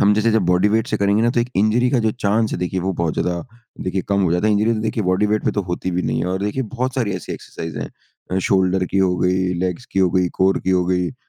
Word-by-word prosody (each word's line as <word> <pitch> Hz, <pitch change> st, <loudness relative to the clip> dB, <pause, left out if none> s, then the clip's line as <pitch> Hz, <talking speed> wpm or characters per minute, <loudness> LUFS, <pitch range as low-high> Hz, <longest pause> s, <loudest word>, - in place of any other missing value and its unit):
हम 100 Hz, +1 st, +5 dB
जैसे 110 Hz, +2 st, +2 dB
जब 110 Hz, -2 st, +3 dB
बॉडी 90 Hz, +3 st, +3 dB
वेट 110 Hz, +2 st, +1 dB
से 110 Hz, -, -1 dB
करेंगे 100 Hz, +1 st, +2 dB
ना 120 Hz, -, +3 dB
तो 120 Hz, -, +1 dB
एक 120 Hz, -, -1 dB
इंजरी 110 Hz, +5 st, +3 dB
का 130 Hz, -, +2 dB
जो -, -, +3 dB
चांस 110 Hz, -1 st, 0 dB
है -, -, -2 dB
देखिए 90 Hz, +1 st, -2 dB
वो 95 Hz, +2 st, -1 dB
बहुत 85 Hz, -2 st, 0 dB
ज़्यादा 90 Hz, -1 st, -1 dB, 0.4 s
देखिए 95 Hz, 0 st, -2 dB
कम 100 Hz, -1 st, +2 dB
हो 85 Hz, -3 st, +2 dB
जाता 90 Hz, +4 st, +1 dB
है। 110 Hz, -, +3 dB
इंजरी 105 Hz, +3 st, +2 dB
तो 110 Hz, -, -2 dB
देखिए 110 Hz, 0 st, -1 dB
बॉडी 95 Hz, +3 st, +2 dB
वेट 105 Hz, +1 st, 0 dB
पे -, -, +2 dB
तो 100 Hz, -, -1 dB
होती 90 Hz, +1 st, -3 dB
भी 90 Hz, 0 st, -1 dB
नहीं -, -, -1 dB
है। -, -, -1 dB
और 95 Hz, +1 st, -2 dB
देखिए 105 Hz, +6 st, -1 dB
बहुत 130 Hz, +1 st, -2 dB
सारी 115 Hz, -7 st, 0 dB
ऐसी -, -, -7 dB
एक्सरसाइज़ 80 Hz, -3 st, -7 dB
है। -, -, -4 dB, 0.4 s
अ, 95 Hz, -, +2 dB
शोल्डर 95 Hz, -1 st, +2 dB
की 100 Hz, -, +1 dB
हो 95 Hz, -2 st, +2 dB
गई, 90 Hz, 0 st, +1 dB
लेग्स 90 Hz, +6 st, -3 dB
की -, -, -1 dB
हो 90 Hz, -2 st, +3 dB
गई, 90 Hz, 0 st, +2 dB
कोर 95 Hz, +1 st, +3 dB
की 95 Hz, -, +1 dB
हो 90 Hz, -1 st, +2 dB
गई, 90 Hz, -1 st, +1 dB
अ, -, -, -14 dB
95 Hz, 300 wpm, -20 LUFS, 90-110 Hz, 0.4 s, हम